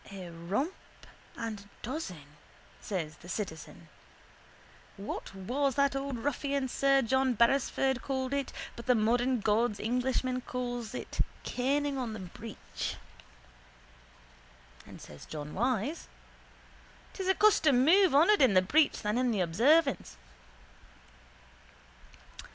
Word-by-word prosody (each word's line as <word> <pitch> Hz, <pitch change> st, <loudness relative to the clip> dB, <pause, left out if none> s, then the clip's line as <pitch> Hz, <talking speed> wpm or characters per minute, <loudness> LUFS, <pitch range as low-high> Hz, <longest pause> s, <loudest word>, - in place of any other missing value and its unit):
—A 185 Hz, -3 st, -8 dB
rump 195 Hz, -, -2 dB, 0.6 s
and 215 Hz, -3 st, -6 dB
dozen, 215 Hz, -, -5 dB, 0.5 s
says 160 Hz, -7 st, -4 dB
the 175 Hz, -, -13 dB
citizen, 180 Hz, -6 st, -6 dB, 1.1 s
was 200 Hz, +2 st, -4 dB
what 260 Hz, +8 st, -1 dB
that 280 Hz, -1 st, +2 dB
old 275 Hz, -2 st, -3 dB
ruffian 280 Hz, +1 st, -1 dB
sir 275 Hz, +1 st, +3 dB
John 265 Hz, +1 st, +2 dB
Beresford 265 Hz, +2 st, +2 dB
called 265 Hz, -1 st, -2 dB
it 280 Hz, -1 st, -1 dB, 0.2 s
but 235 Hz, +1 st, -10 dB
the 250 Hz, -, +5 dB
modern 240 Hz, +2 st, +2 dB
God's 210 Hz, +1 st, +1 dB
Englishman 255 Hz, +2 st, 0 dB
calls 245 Hz, -3 st, -4 dB
it -, -, -7 dB, 0.2 s
caning 275 Hz, +2 st, 0 dB
on 240 Hz, -4 st, -3 dB
the 215 Hz, -, -6 dB
breech. 200 Hz, +4 st, -6 dB, 1.9 s
And -, -, -11 dB
says 75 Hz, -1 st, -12 dB
John 150 Hz, -1 st, -7 dB
Wyse: 250 Hz, -, -1 dB, 1.1 s
—'Tis 380 Hz, -2 st, -4 dB
a 380 Hz, -, +3 dB
custom 295 Hz, -12 st, +4 dB
more 380 Hz, +6 st, +6 dB, 0.2 s
honoured 415 Hz, +3 st, +4 dB
in 250 Hz, -7 st, +5 dB
the 185 Hz, -, +6 dB
breach 300 Hz, +10 st, +2 dB
than 210 Hz, +3 st, 0 dB
in 255 Hz, -1 st, +2 dB
the 210 Hz, -5 st, 0 dB
observance. 270 Hz, -, +2 dB
250 Hz, 115 wpm, -30 LUFS, 210-275 Hz, 1.9 s, more